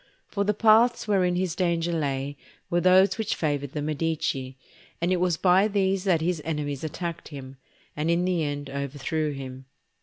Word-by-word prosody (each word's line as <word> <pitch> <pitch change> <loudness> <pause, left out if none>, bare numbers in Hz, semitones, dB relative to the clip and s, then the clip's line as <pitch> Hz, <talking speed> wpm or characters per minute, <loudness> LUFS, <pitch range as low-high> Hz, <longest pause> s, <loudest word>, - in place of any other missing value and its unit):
For 200 - -2
the 210 0 0
paths 225 +2 +4
wherein 185 -4 +2
his 180 -2 -1
danger 170 -2 0
lay 140 -3 -2 0.4
were 175 0 +2
those 185 +4 +5
which 220 -1 -1
favoured 145 -3 -2
the 150 - -3
Medici, 150 -4 -2 0.4
and 170 +2 0
it 185 - +2
was 180 -2 +1
by 190 +3 +4
these 195 -2 0
that 175 -5 +3
his 170 -1 -1
enemies 150 -3 -3
attacked 170 +1 -5
him, 135 -2 -9 0.4
and 150 +2 -1
in 170 +1 +2
the 180 -3 +1
end 145 -1 -3
overthrew 140 +2 -2
him. 130 -1 -8
165 Hz, 175 wpm, -26 LUFS, 145-185 Hz, 0.4 s, those